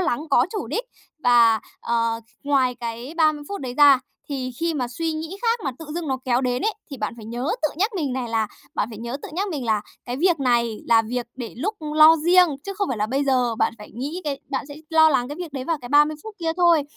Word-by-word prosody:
lắng 310 -8 0
có - - +5
chủ 430 - -4
đích, - - -2 0.4
và, 235 -2 +5 0.2
ờ, 230 -1 0 0.2
ngoài 265 -3 +2
cái 235 +4 -6
30 310 -2 +3
phút 400 -4 -5
đấy 250 -2 -5
ra 285 -3 +8 0.3
thì 260 -3 -3
khi 335 -1 0
mà 250 -4 -1
suy 320 +6 -2
nghĩ 320 +4 -5
khác 460 0 +1
mà 270 - 0
tự 320 - -8
dưng 335 -4 -3
nó 260 -1 0
kéo 245 -1 +2
đến 250 -1 -1
ấy 435 - +1 0.2
thì 275 - -6
bạn 215 -1 -3
phải 220 - -10
nhớ 240 +4 -4 0.2
tự 305 - +3
nhắc 405 +7 +1
mình 285 -7 -1
này 250 -2 -3
là 225 -1 +1 0.3
bạn 205 - 0
phải 220 - -8
nhớ 235 +3 -4
tự - - -6
nhắc 390 +4 -1
mình 290 -7 -4
là: 220 -2 +1 0.2
"Cái 245 +1 -4
việc 340 0 +2
này 235 -4 +2
là 225 -1 +5
việc 240 +2 -3
để 240 -3 -6
lúc 405 - -2 0.2
lo 315 +1 +8
riêng, 350 +3 +5 0.2
chứ 395 - -4
không 400 -1 -1
phải 250 - -1
là 210 - +1
bây 275 +4 0
giờ." 250 -4 +2
Bạn - - +1
phải 210 - -11
nghĩ 290 +9 -4
cái 280 -2 -3
bạn 275 - -2
sẽ 285 - -8 0.2
lo 315 -1 +6
lắng 250 -4 +1
cái 290 - -6
việc 345 -4 -6
đấy 265 -2 -4
vào 330 +2 0
cái 245 - -8
30 295 +2 +4
phút 440 -1 -9
kia 325 -2 -1
thôi. 340 -4 +5
275 Hz, 260 wpm, -23 LUFS, 240-325 Hz, 0.4 s, ra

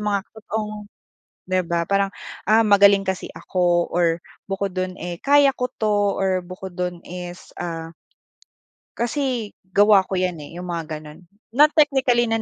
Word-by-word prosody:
mga 205 -2 0
totoong 215 -1 -5 0.6
'di 185 0 0
ba, 170 0 0
parang, 195 +2 +1 0.4
ah, 220 +2 +5
magaling 200 -1 +6
kasi 190 -1 -3
ako, 175 -2 +1
or 170 -1 +1 0.2
bukod 195 0 -2
do'n, 185 0 -3
eh, 175 -1 -6
kaya 285 0 +5
ko 250 -1 -2
'to, 210 -4 0
or 190 -1 +1
bukod 185 +1 -8
dun 180 -1 -4
is 180 0 -8
ah 165 -1 -5 1.1
kasi 240 -3 -1
gawa 200 +2 +5
ko 190 - -1
yan, 180 -3 -1
eh, 155 +4 -10
'yong 180 - -6
mga 165 -3 -4
gano'n. 150 +2 -12 0.3
Not 295 +4 +6
technically 265 -5 +4
na 225 -1 0
195 Hz, 155 wpm, -22 LUFS, 175-215 Hz, 1.1 s, magaling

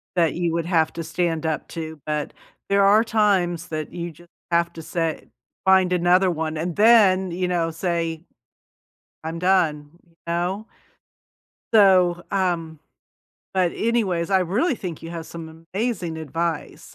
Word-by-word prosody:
that 170 -3 +2
you 175 -1 -1
would 165 -1 -1
have 165 -3 +2
to 165 - -5
stand 165 0 -1
up 160 -1 -2
to. 160 -2 -7
But 150 -1 -2 0.4
there 200 0 +4
are 205 +3 +6
times 190 -7 +1
that 155 -1 -5
you 170 0 -4
just 170 +3 -19 0.2
have 170 0 +2
to 165 - -8
say 165 0 -3 0.4
"Find 190 -1 +4
another 180 +1 +3
one," 160 -1 -3
and 165 +2 -3
then, 205 -4 +5
you 180 +1 -1
know, 170 -2 0
say, 165 -1 -2 1.0
"I'm 165 +1 -4
done." 165 -5 +1 0.2
You 165 -1 -30
know? 175 +5 -2 1.1
So, 185 -4 +5
um 170 -5 -1 0.8
but, 185 -2 +2
anyways, 205 -7 0
I 190 -1 +3
really 220 - +1
think 175 -8 -7
you 165 - -7
have 165 -1 -6
some 165 -1 -10
amazing 195 -7 -2
advice. 165 +1 -4
175 Hz, 150 wpm, -23 LUFS, 165-190 Hz, 1.1 s, are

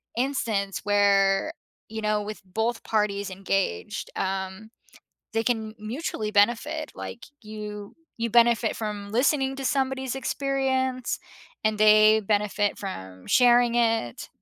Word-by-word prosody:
instance 230 -6 -1
where, 200 +4 +3 0.4
you 220 0 -5
know, 210 0 +1
with 210 +1 -7
both 225 +5 -2
parties 205 -2 0
engaged, 195 - -2
um, 190 +2 -3 0.6
they 225 0 +1
can 220 -3 -1
mutually 215 -1 -4
benefit, 240 +9 +1
like, 235 - -8
you 210 -2 -8 0.2
you 230 0 -1
benefit 235 0 +3
from 210 -2 -5
listening 270 +3 +1
to 270 - -6
somebody's 265 -1 0
experience, 265 -2 -1 0.5
and 215 -1 +1
they 215 0 +6
benefit 205 0 0
from 95 - -8
sharing 245 -1 +5
it. 225 - 0
215 Hz, 115 wpm, -26 LUFS, 205-245 Hz, 0.6 s, they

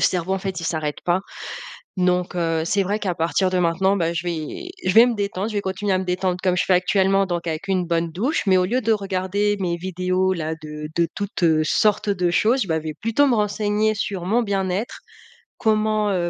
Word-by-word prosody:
cerveau, 185 +1 +1
en - - -1
fait, 190 -2 -4
il - - -6
s'arrête 155 -3 -2
pas, 175 +1 +2 0.8
donc 180 0 +1
heu, 165 -2 0
c'est 195 +4 +1
vrai 205 +3 -1
qu'à 190 -4 -2
partir 170 +3 +1
de 185 - 0
maintenant, 180 +3 +2
bah, 170 -2 0
je 170 +1 -3
vais 175 - -4 0.2
je 185 - +3
vais 230 +2 +9
me 245 - 0
détendre, 200 0 -2
je 215 - -7
vais 205 - +1
continuer 190 +1 -2
à 185 - +2
me 190 - -3
détendre 180 0 -1
comme 180 -1 +2
je - - +2
fais 190 - +1
actuellement 195 +2 +2
donc 175 -1 -3
avec 165 +4 -4
une 185 -2 +1
bonne 165 -1 0
douche, 250 - 0
mais 190 -1 +5
au 180 - +2
lieu 250 +6 0
de 225 -1 +1
regarder 200 +1 0
mes 175 -2 -1
vidéos-là 185 -2 -1
de 150 0 -7
de 170 -1 +2
toutes, 200 -3 -5
heu, 160 -2 +4
sortes 210 +5 +2
de 180 -3 +1
choses, 230 +7 +2
bah, 160 - 0
je - - -15
vais 155 - -4
plutôt 230 - +1
me 255 - +3
renseigner 210 0 +1
sur 195 -3 -3
mon 230 +6 +2
bien-être, 195 +1 -2 0.6
comment, 215 -2 +1
heu, 175 -2 0
185 Hz, 225 wpm, -22 LUFS, 175-205 Hz, 0.8 s, vais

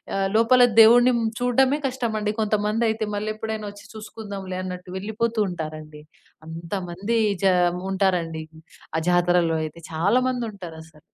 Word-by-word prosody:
ఆహ్, 195 0 +1
లోపల 230 +3 +5 0.2
దేవుడుని 240 +3 +7
హ్మ్, 225 -1 0
చూడడమే 255 +3 +2
కష్టమండి. 225 -5 -2
కొంతమందయితే 215 +1 0
మళ్ళెప్పుడైనా 215 +1 -4
ఒచ్చి 205 0 -15
చూసుకుందాంలే 200 -4 -7
అన్నట్టు 180 -1 -7
వెళ్ళిపోతూ 220 +3 -2
ఉంటారండి. 155 -2 -7 0.4
అంతమందీ 175 +6 -3 0.2
చాం 180 -2 +3
ఉంటారండి 180 -5 0 0.5
ఆ - - +2
జాతరలో 175 -2 +2
అయితే. 155 +1 -7
చాలామందుంటారసలు. 190 -5 -2
205 Hz, 110 wpm, -23 LUFS, 175-225 Hz, 0.5 s, దేవుడుని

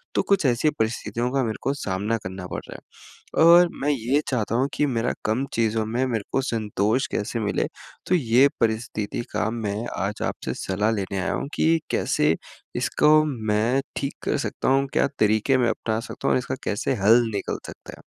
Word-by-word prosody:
तो - - +4
कुछ 195 -6 +2
ऐसी 125 +4 +3
परिस्थितियों 115 +2 -1
का 135 -1 +1
मेरे 110 -2 -2
को 135 - 0
सामना 105 -1 -1
करना 95 0 -6
पड़ - - -4
रहा - - -9
है, - - -5
और 175 +1 +8
मैं 145 - +1
ये 135 +2 +1
चाहता 115 -4 -1
हूँ 130 +3 +2
कि 150 - +2
मेरा 120 -4 0
कम 115 +6 +1
चीज़ों 110 -1 +1
में 120 +4 0
मेरे 115 -4 -1
को 135 - +2
संतोष 110 0 0
कैसे 110 +3 -2
मिले? 105 - 0 0.4
तो 185 - +3
ये 130 -3 +4
परिस्थिति 110 -1 -1
का 110 - 0
मैं 110 -3 -3 0.2
आज 100 +3 -3
आपसे - - -4
सलाह 105 +3 +1
लेने 100 -2 -2
आया 90 - -1
हूँ - - -3
कि 165 +1 +3
कैसे 80 +2 +2 0.4
इसको 150 - +3 0.3
मैं 110 +6 +2 0.2
ठीक 140 - -2
कर - - 0
सकता - - -2
हूँ? 135 +1 +3
क्या - - +3
तरीके 110 +5 +3
मैं 120 -2 +2
अपना 110 -1 -1
सकता 115 - -5
हूँ - - +4
और - - +4
इसका 125 - -4
कैसे 105 +5 -1
हल 115 +4 +7
निकल 100 - -2
सकता - - -12
है? - - -16
115 Hz, 195 wpm, -24 LUFS, 105-135 Hz, 0.4 s, और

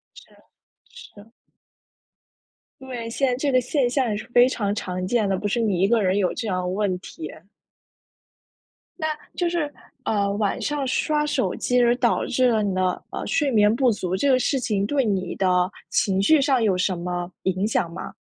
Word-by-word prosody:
是 - - -16 0.6
是。 210 +2 -15 1.5
对， 250 -3 -6
现 270 +4 0
在 250 - +1
这 275 +2 -1
个 255 - +4
现 250 +1 0
象 255 -1 0
也 210 - -1
是 215 - -7
非 245 +1 +7
常 205 -6 -1
常 185 -3 -4
见 215 +1 +1
的， 195 -1 0
不 205 - -2
是 235 - 0
你 205 -6 +1
一 195 - +4
个 230 +1 +3
人 190 0 +1
有 190 -3 +1
这 230 - -4
样 185 -3 -1
的 180 - -3
问 190 0 -1
题。 160 -3 -8 1.7
那 315 -3 -2 0.3
就 350 -1 0
是， 335 -4 -2 0.3
呃， 200 -4 0
晚 205 -1 -1
上 290 -2 -1
刷 300 +3 0
手 295 -3 -1
机 250 0 +1
而 240 0 +4
导 240 -2 +1
致 255 0 +2
了 220 -2 +2
你 200 -2 -1
的， 185 -1 0
呃， - - -5
睡 295 -3 +1
眠 210 -2 +4
不 250 +1 +3
足， 185 -4 -2
这 275 +9 +1
个 260 - +5
事 270 +2 0
情 210 -5 0
对 270 +4 +1
你 190 -4 -1
的 180 -1 +2 0.2
情 195 -1 +1
绪 300 +9 +5
上 270 -3 +2
有 200 -5 +2
什 180 0 0
么 175 0 -4
影 190 +1 0
响 175 -6 0
吗？ - - -7
215 Hz, 210 characters per minute, -23 LUFS, 190-255 Hz, 1.7 s, 非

